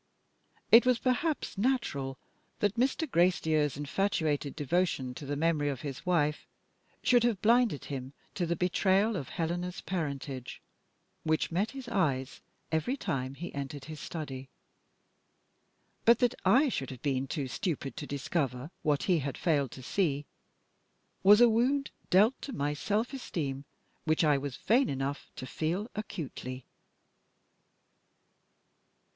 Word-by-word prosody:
It 230 +2 +9
was 250 -1 +3
perhaps 255 -2 -1
natural 195 - 0 0.4
that 205 -1 +1
Mr. 260 +7 +1
Gracedieu's 160 - +2
infatuated 150 -2 0
devotion 150 -4 0
to 140 +2 -8
the 145 - -1
memory 150 -1 +1
of 135 -4 -4
his 140 +3 -6
wife 150 -4 +1 0.6
should 245 -2 +5
have 235 -5 +2
blinded 235 - +3
him 135 -1 -5 0.2
to 175 -3 -1
the 170 - 0
betrayal 190 +5 +2
of 140 -8 -4
Helena's 175 +2 -2
parentage, 140 -7 -4 0.6
which 155 +1 +1
met 195 +6 +1
his 270 -2 -8
eyes 145 - 0 0.3
every 160 - 0
time 135 - -3
he 170 +5 -7
entered 140 0 -5
his 155 -1 -8
study. 135 -5 -6 1.5
But 235 +1 +6
that 245 -2 +2
I 275 +5 +5
should 135 - -2
have 130 -3 -9
been 135 -2 0
too 140 -1 -3
stupid 145 -2 -3
to 145 - -5
discover 140 -1 -2
what 150 -3 +1
he 180 -4 +3
had 140 -1 -4
failed 145 -6 +1
to 130 - -10
see, 145 -2 0 1.0
was 205 +2 +8
a 240 - +9
wound 255 +5 +2 0.2
dealt 210 +8 +4
to 275 - -6
my 145 -6 -1
self 210 - -1
esteem 145 - -4 0.4
which 160 +1 +2
I 150 -3 +4
was 140 -2 -5
vain 250 +4 +3
enough 135 +1 -3
to - - -6
feel 170 - -2
acutely. 140 - -6
160 Hz, 140 wpm, -30 LUFS, 140-210 Hz, 1.5 s, It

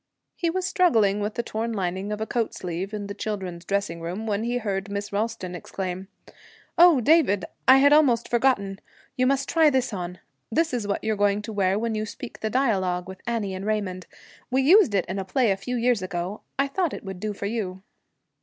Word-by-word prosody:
He 340 - 0
was 370 +2 -1
struggling 225 - +3
with 210 +1 -3
the 235 - -1
torn 230 +1 -3
lining 190 0 -2
of 210 - -3
a 220 - -1
coat 230 -1 -1
sleeve 180 +2 -4
in 210 -1 -4
the 200 - -5
children's 190 -5 -5
dressing 195 -3 -2
room, 180 +6 -4
when 210 0 -1
he 240 +1 0
heard 200 -4 -3
Miss 200 0 -4
Ralston 205 -3 -2
exclaim, 185 +1 -5 0.7
'Oh, 340 -6 +7
David! 240 - +4 0.2
I 260 +1 +9
had 285 +2 +6
almost 260 -7 +4
forgotten. 220 -6 +1 0.3
You 255 0 +2
must 275 0 +1
try 320 -2 +5
this 260 -5 0
on. 180 -1 -5 0.3
This 320 +4 +1
is 230 -5 -2
what 200 - -2
you're 220 0 0
going 205 0 +1
to 220 - -6
wear 195 -1 +2
when 230 +1 -1
you 215 0 -2
speak 240 +3 -8
the 220 - -2
dialogue 190 -8 0
with 190 0 -9
Annie 220 -5 -1
and 185 +1 -5
Raymond. 200 -4 -2 0.4
We 265 +1 +2
used 330 - +6
it 190 - +2
in 190 +2 -4
a - - -2
play 220 +4 +1
a - - +2
few 250 +6 -4
years 240 -3 +2
ago. 185 +2 -4 0.2
I 275 +1 +2
thought 340 +3 -1
it - - -9
would 190 -2 -7
do 215 +2 -2
for 200 - -6
you.' 195 -4 -3
210 Hz, 215 wpm, -25 LUFS, 190-245 Hz, 0.7 s, I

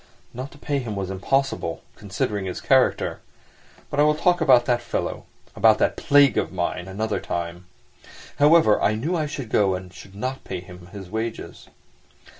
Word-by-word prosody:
Not 130 +3 -6
to - - -15
pay 145 -1 -2
him 115 -5 -5
was 95 -1 -3
impossible, 135 +8 -1
considering 100 0 -3
his 90 - -4
character. - - +2 0.7
But 145 - -2
I - - +6
will 150 0 +3
talk 175 +3 +2
about 125 -2 +5
that 120 -1 +1
fellow, - - -4 0.3
about - - +5
that - - +1
plague 140 -4 +4
of - - -3
mine, 90 0 -3
another 105 +3 -2
time. 85 +1 -5 0.7
However, 150 -7 +5
I 105 - +2
knew 150 +12 -2
I 155 -3 -1
should 140 -5 -6
go 100 -3 +2
and 90 0 -8
should 95 +1 -13
not 130 +6 -4
pay 95 - -5
him 90 0 -13
his 95 -1 -10
wages. 110 +4 -5
110 Hz, 175 wpm, -23 LUFS, 95-140 Hz, 0.7 s, I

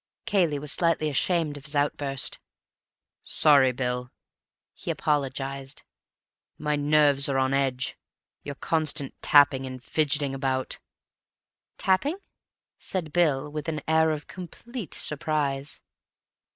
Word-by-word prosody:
Cayley 170 -7 +2
was 145 0 -5
slightly 165 -2 +1
ashamed 160 0 +1
of 140 - -12
his 145 0 -2
outburst. 145 -2 0 0.8
"Sorry, 140 -4 +5
Bill," 125 0 -3 0.6
he - - -8
apologized. 135 -1 -2 0.7
"My 150 0 0
nerves 145 -1 +3
are 135 - 0
on 130 0 +1
edge. 135 -2 0 0.4
Your 145 - -7
constant 155 -3 0
tapping 140 -2 +5
and 130 0 -7
fidgeting 145 -2 +1
about—" 130 -1 -2 1.0
"Tapping?" 275 - +1 0.6
said 165 -6 -4
Bill 150 -5 +2
with 150 0 -4
an 155 -2 -3
air 160 0 +4
of 150 -2 -3
complete 195 - -8
surprise. 145 -2 0
145 Hz, 110 wpm, -26 LUFS, 135-155 Hz, 1.0 s, Sorry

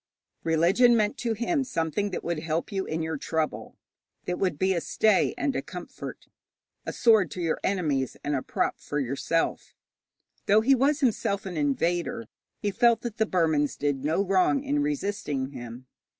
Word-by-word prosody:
Religion 180 +10 +4
meant 210 -1 +1
to 235 -2 -1
him 265 +7 0
something 170 - -1
that 185 - -5
would 170 -2 -2
help 160 +4 -2
you 195 -1 -2
in 160 +1 -2
your 160 -1 -2
trouble, 160 +2 -3 0.5
that 180 - -2
would 180 -6 0
be 190 +4 +2
a 170 - -1
stay 215 +2 +2
and 280 - -1
a - - 0
comfort, - - -9 0.6
a - - -1
sword 220 -8 +4
to 180 - -7
your 165 -2 0
enemies 150 -9 0
and 145 - -1
a 130 - -1
prop - - -1
for 145 - -4
yourself. 140 +5 -1 0.7
Though 210 +2 +5
he 265 +5 +4
was 280 +3 +2
himself 200 -6 0
an 185 -2 -5
invader, 175 - 0 0.3
he 205 - -2
felt 235 +1 +3
that 235 -2 -5
the 220 -1 +2
Burmans 160 -6 +1
did 140 -2 -1
no 160 +6 +1
wrong 195 +8 +2
in 290 +1 0
resisting 205 - -2
him. 120 -1 -9
185 Hz, 175 wpm, -27 LUFS, 155-225 Hz, 0.7 s, Though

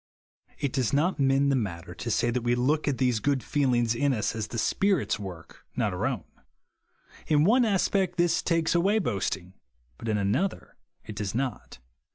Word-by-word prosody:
It 140 - -2
does 130 -4 0
not 155 +5 +1
mend 135 +1 +3
the - - +3
matter 90 -7 -4
to 115 - -6
say 120 +2 +1
that 125 +1 -1
we 120 +1 +1
look 145 +6 +1
at 140 -3 +1
these 125 -4 +1
good 140 +2 0
feelings 120 -5 +1
in 140 +3 +1
us, 110 -2 -1
as 110 -2 -3
the 115 - -6
Spirit's 190 - +1
work, 90 -5 -9
not - - 0
our - - -1
own. - - -3 1.0
In 150 -1 +4
one 240 +7 +4
aspect 190 -3 +1
this 175 -1 +2
takes 165 -2 +1
away 190 +5 +3
boasting, 95 - -2 0.5
but 115 - -5
in 105 - +1
another 110 - -1 0.3
it 110 - -8
does 105 0 -3
not. 130 -3 -3
130 Hz, 185 wpm, -27 LUFS, 110-160 Hz, 1.0 s, In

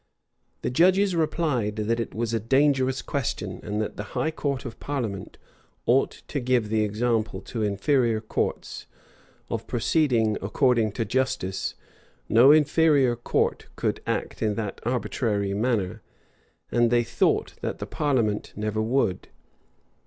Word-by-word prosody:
[*] - - -46
The - - -1
judges 185 +6 +4
replied, 150 -9 0
that 110 +2 -1
it 115 - -4
was 115 +1 -2
a 115 - +1
dangerous 130 +2 +2
question; 115 -8 -3
and 105 0 -3
that - - -6
the 105 - -3
high 160 - +1
court 140 -4 -3
of 120 - -7
parliament 115 -9 -4 0.5
ought 130 +3 +1
to 145 - -2
give 125 -4 +1
the 110 0 +2
example 110 +1 0
to 115 - -5
inferior 110 +3 +1
courts, 110 - -3 0.6
of - - -3
proceeding 115 -9 +2
according 115 0 +2
to 115 -1 -2
justice; 100 -6 -1 0.5
no 120 +5 +7
inferior 150 -4 +4
court 120 - -1
could - - -1
act - - -2
in 105 -2 +1
that 105 -2 -4
arbitrary 110 -5 -1
manner, 105 -3 -1 0.7
and 120 -1 +3
they 120 0 +3
thought - - +1
that - - -3
the - - -5
parliament 120 -8 0
never 110 +1 -2
would. 110 -5 0
120 Hz, 140 wpm, -25 LUFS, 105-135 Hz, 0.7 s, no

